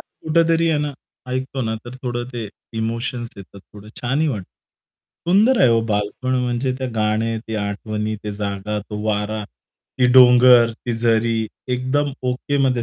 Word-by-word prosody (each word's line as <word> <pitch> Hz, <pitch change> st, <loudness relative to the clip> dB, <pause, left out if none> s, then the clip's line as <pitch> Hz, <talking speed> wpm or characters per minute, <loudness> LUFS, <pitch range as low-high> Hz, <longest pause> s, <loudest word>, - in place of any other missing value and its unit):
कुठेतरी 165 Hz, +1 st, +1 dB
आहे 155 Hz, -2 st, +2 dB
ना 145 Hz, 0 st, -2 dB, 0.4 s
ऐकतो 130 Hz, +1 st, -3 dB
ना, 110 Hz, -1 st, -1 dB
तर 120 Hz, +1 st, -9 dB
थोडं 120 Hz, -1 st, -2 dB
ते 115 Hz, -3 st, -5 dB, 0.3 s
इमोशन्स 115 Hz, +2 st, -3 dB
येतात, 100 Hz, 0 st, -12 dB
थोडं 105 Hz, +2 st, -15 dB
छानही 135 Hz, +6 st, +1 dB
वाटतं. 105 Hz, -9 st, -3 dB, 0.9 s
सुंदर 220 Hz, +7 st, +5 dB
आहे 130 Hz, -, +6 dB
हो 115 Hz, -1 st, +4 dB
बालपण, 105 Hz, +5 st, -1 dB
म्हणजे 125 Hz, +2 st, -1 dB
ते 130 Hz, -, -2 dB
गाणं, 110 Hz, +1 st, 0 dB
ते 110 Hz, -, -3 dB
आठवणी, 105 Hz, +1 st, -3 dB
ती 105 Hz, -, -3 dB
जागा, 100 Hz, +1 st, -2 dB
तो 105 Hz, +1 st, -7 dB
वारा, 105 Hz, 0 st, -1 dB, 0.5 s
ते 125 Hz, -, +5 dB
डोंगर, 125 Hz, -1 st, +7 dB
ती 120 Hz, +2 st, -5 dB
झरी, 115 Hz, 0 st, +1 dB, 0.4 s
एकदम 140 Hz, +3 st, 0 dB, 0.2 s
ओकेमध्ये 130 Hz, -1 st, 0 dB
120 Hz, 150 wpm, -21 LUFS, 110-130 Hz, 0.9 s, डोंगर